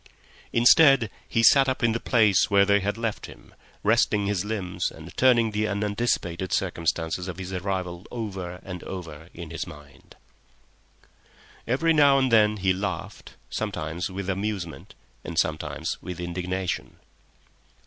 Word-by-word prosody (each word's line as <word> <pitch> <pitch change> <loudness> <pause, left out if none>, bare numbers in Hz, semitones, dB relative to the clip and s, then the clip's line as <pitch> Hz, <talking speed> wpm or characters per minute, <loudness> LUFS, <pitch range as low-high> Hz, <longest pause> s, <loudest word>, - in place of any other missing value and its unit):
Instead, 125 -1 +6 0.2
he 115 - +1
sat 135 +4 +6
up 130 - -2
in 115 - +4
the 115 - -1
place 105 -5 +3
where 100 -1 +5
they 100 0 +4
had 100 +2 -2
left 115 -2 -3
him, - - -15 0.3
resting 105 -1 +2
his 100 -2 0
limbs 105 -4 -2
and - - -12
turning 120 -3 +4
the 105 +1 0
unanticipated 100 -3 -1
circumstances 85 -1 -1
of 90 - -6
his 95 0 -6
arrival 90 -1 -3
over 95 -6 -5
and 90 -2 -7
over 85 -4 -8
in 85 -2 -8
his 85 - -4
mind. 75 -2 -14 1.5
Every 160 +8 +2
now 145 -3 +5
and 130 -2 +1
then 105 -1 +4
he 95 -1 +2
laughed, 95 -2 -5 0.2
sometimes 80 +3 -3
with 95 0 -5
amusement 95 -3 -4 0.3
and 85 - -7
sometimes 80 -2 -2
with 90 -1 -7
indignation. 90 +1 -3
100 Hz, 140 wpm, -25 LUFS, 90-110 Hz, 1.5 s, Instead